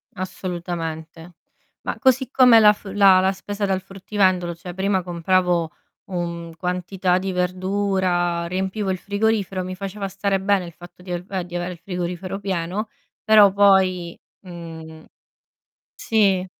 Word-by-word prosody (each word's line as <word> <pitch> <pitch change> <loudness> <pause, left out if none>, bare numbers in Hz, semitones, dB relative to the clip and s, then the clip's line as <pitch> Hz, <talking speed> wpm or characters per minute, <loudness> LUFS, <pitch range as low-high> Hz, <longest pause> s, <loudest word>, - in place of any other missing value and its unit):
Assolutamente. 170 -2 -6 0.5
Ma - - -4
così 260 -1 +3
come 250 -3 +7
la 210 -1 +7
f 205 - -19
la 195 -2 +6
la 190 +1 +2
spesa 200 +2 -4
dal 190 -1 0
fruttivendolo, 185 -3 0
cioè 175 +1 -9
prima 190 0 0
compravo 175 -1 +1 0.4
un 170 -2 -4
quantità 180 +1 -1
di 190 0 -2
verdura, 180 -1 0
riempivo 190 +2 -2
il 185 - -2
frigorifero, 200 -1 -1
mi 185 0 -5
faceva 195 +1 -5
stare 195 +1 -1
bene 195 -2 +1
il 170 - -10
fatto 175 +1 -15
di 180 -1 -9
a - - 0
uhm, 190 -2 -3
di 175 0 -9
avere 175 +1 -3
il - - -13
frigorifero 180 +1 -4
pieno, 190 +2 -3 0.3
però 210 -3 +7
poi, 190 -3 +3 0.2
mhmm 165 -3 -10 0.9
Sì. 195 -4 +1
185 Hz, 140 wpm, -22 LUFS, 175-195 Hz, 0.9 s, come